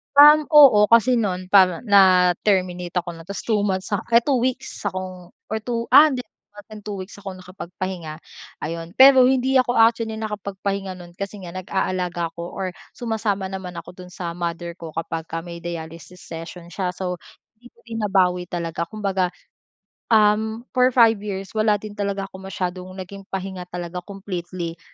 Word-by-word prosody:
Um, 300 +1 +8
oo 265 -9 +8
kasi 230 +3 +4
noon 185 -4 -2
parang, 185 -4 +5
na 185 -3 +6
terminate 180 -3 0
ako 170 -1 -8
'no 165 - -12
ta's 200 +2 -6
2 210 -3 0
months 190 -1 -2
a 205 - +1 0.2
eh 235 - +7
2 270 +1 +1
weeks 255 -1 -3
akong 185 -2 -5 0.2
or 220 - -1
2 230 +1 -4
ah 300 -1 +7
'di 255 - -2 0.6
2 210 - -4
weeks 185 +2 -10
akong 190 -2 -8
nakapagpahinga, 180 -3 -7 0.4
ayon. 165 +2 -5
Pero 265 0 +8
hindi 260 +1 +3
ako 245 -1 +2
actually 225 -1 +3
nakapagpahinga 200 -2 -4
no'n 175 -1 -13
kasi 200 0 -6
nga 175 - -8
nag-aalaga 180 -2 -2
ako 170 +1 -8
or 190 - -3 0.2
sumasama 210 -5 -2
naman 190 -2 -6
ako 170 -1 -8
dun 180 -1 -11
sa 170 -1 -5
mother 170 0 -4
ko 165 -3 -9
kapagka 165 0 -4
may 170 0 -8
dialysis 170 +1 -8
session 170 +1 -9
siya, 180 +1 -3
so 180 -1 -4 0.4
hindi 245 +2 -18
ko - - -28
din 225 - -4
nabawi 185 -4 +1
talaga 170 -1 -3
kumbaga, 195 -3 -2 0.7
um, 220 +1 +3
for 255 -1 +4
5 225 -3 +5
years 195 -2 -5
wala 215 -1 +2
din 210 +1 -7
talaga 200 -1 -2
akong 190 0 -10
masyadong 185 -1 -5
naging 195 +1 -9
pahinga 190 -2 -5
talaga 180 0 -5
completely. 180 -3 -6
190 Hz, 165 wpm, -22 LUFS, 180-215 Hz, 0.7 s, Um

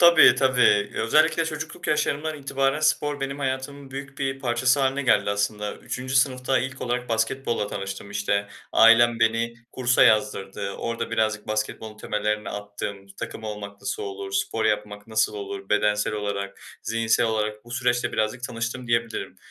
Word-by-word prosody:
Tabii 170 -2 +8
tabii, 125 -6 +3
özellikle - - +3
çocukluk - - -6
yaşlarımdan 150 +1 0
itibaren 135 +1 0
spor 145 -1 +1
benim 135 +1 -3
hayatımın 135 0 -4
büyük 135 0 -7
bir 135 -1 -1
parçası 130 +2 +2
hâline 135 +1 +1
geldi 110 -5 +3
aslında. 105 +1 -1
3'üncü 130 +1 -5
sınıfta 130 -1 +2
ilk 130 +1 -4
olarak 125 0 -2
basketbolla 115 0 0
tanıştım, 100 0 -6
işte. 100 0 0 0.2
Ailem 115 +1 +6
beni 115 +1 +2 0.2
kursa 125 -1 +3
yazdırdı, 105 -4 +2
orada 115 +2 -4
birazcık 110 -2 0
basketbolun 110 0 -3
temellerini 105 -1 -2
attım, 100 -1 -6
takım 110 - -6
olmak 100 -1 -6
nasıl 100 - -3
olur, 100 0 -6
spor 100 +3 0
yapmak 105 -1 -1
nasıl 110 -1 +1
olur, 100 -1 -6
bedensel 105 0 +2
olarak, 100 -1 -4 0.2
zihinsel 115 +1 +1
olarak 105 0 -2
bu 120 - -15
süreçle 120 0 0
birazcık 110 +3 -1
tanıştım 125 0 -4
diyebilirim. 115 -1 -1
115 Hz, 150 wpm, -25 LUFS, 105-130 Hz, 0.2 s, Tabii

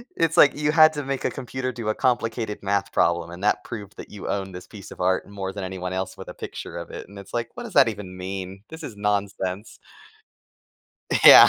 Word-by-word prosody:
it's 165 +1 +2
like 145 - +8
you 150 0 +2
had 155 0 +7
to 145 -1 -3
make 135 0 -2
a - - +3
computer 130 0 -3
do 115 -3 -4
a - - +1
complicated 115 -4 0
math 100 0 +1
problem, 85 -1 +2
and 85 +3 -9
that 105 - +3
proved 105 -4 -7
that - - -8
you 105 - -7
own 95 -1 -1
this 90 0 -9
piece 100 -4 -10
of - - -10
art 95 +2 +1
more 95 -1 -4
than 100 -2 -5
anyone 95 -1 -4
else 95 0 -3
with - - -9
a - - -6
picture - - -7
of - - -6
it. - - -7
And 100 0 -11
it's 100 - -12
like, 120 -1 -1
"What 240 - -6
does 220 -5 -8
that 135 -4 +7
even 95 -4 -7
mean? 95 +1 -5
This 160 0 -9
is 120 -7 -6
nonsense." 100 -1 -1 1.5
Yeah. - - +12
105 Hz, 230 wpm, -25 LUFS, 95-130 Hz, 1.5 s, Yeah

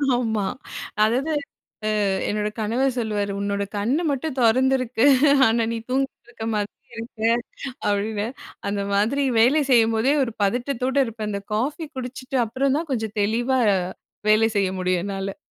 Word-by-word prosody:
ஆமா. 220 -4 0 0.6
அதாவது 250 +8 +1 0.7
அ - - +2 0.3
என்னோட 210 0 -1
கணவர் 245 +5 0
சொல்லுவாரு, 210 -3 -1
உன்னோட 200 0 -1
கண்ணு 250 +12 +1
மட்டும் 275 0 -3
தொறந்திருக்கு. 255 +1 +3 0.4
ஆனா 230 +1 +2
நீ - - -2
தூங்கிட்டு 270 +1 -2
இருக்க 225 -2 -7
மாதிரி 205 -1 -2 0.2
இருக்க. 230 0 -8 0.7
அப்படின்னு, 205 +1 0 0.4
அந்த 200 0 -1
மாதிரி 230 +8 +2 0.2
வேலை 265 +7 +5
செய்யும்போதே 230 +2 +4
ஒரு 235 - -4
பதட்டத்தோடு 255 +5 +1
இருப்பேன். 220 -2 -5
அந்த 200 0 -3
காஃபி 295 +8 -2
குடிச்சுட்ட 255 +1 -4
அப்பறம் 265 +5 0
தான் 325 -1 -6
கொஞ்சம் 220 -4 -2
தெளிவா 240 +5 +1 0.7
வேலை 215 +1 +5
செய்ய 195 -2 +2
முடியும் 180 -1 0
என்னால. 195 -1 -4
230 Hz, 135 wpm, -23 LUFS, 210-260 Hz, 0.7 s, வேலை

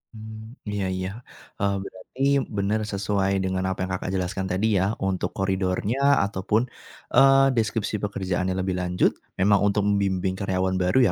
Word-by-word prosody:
Mmm, 110 +1 -9 0.2
iya 100 -2 -1
iya. 95 0 -3 0.5
Eee, 100 0 +1
berarti 95 +7 -10 0.4
benar 100 +2 +1
sesuai 100 -1 0
dengan 95 0 -1
apa 95 0 -2
yang 95 - -4
Kakak 90 0 -3
jelaskan 95 +1 -2
tadi 95 +4 0
ya. 100 +4 +1
Untuk 95 -2 -1
koridornya 100 +9 +1
ataupun, 100 +2 0 0.5
eee, 135 0 +6
deskripsi 110 -3 -1
pekerjaannya 95 -2 -2
lebih 95 0 -1
lanjut 90 0 +2 0.2
memang 100 +1 +4
untuk 100 0 +1
membimbing 95 -2 +1
karyawan 95 -1 0
baru 95 +4 +3
95 Hz, 145 wpm, -25 LUFS, 95-105 Hz, 0.5 s, eee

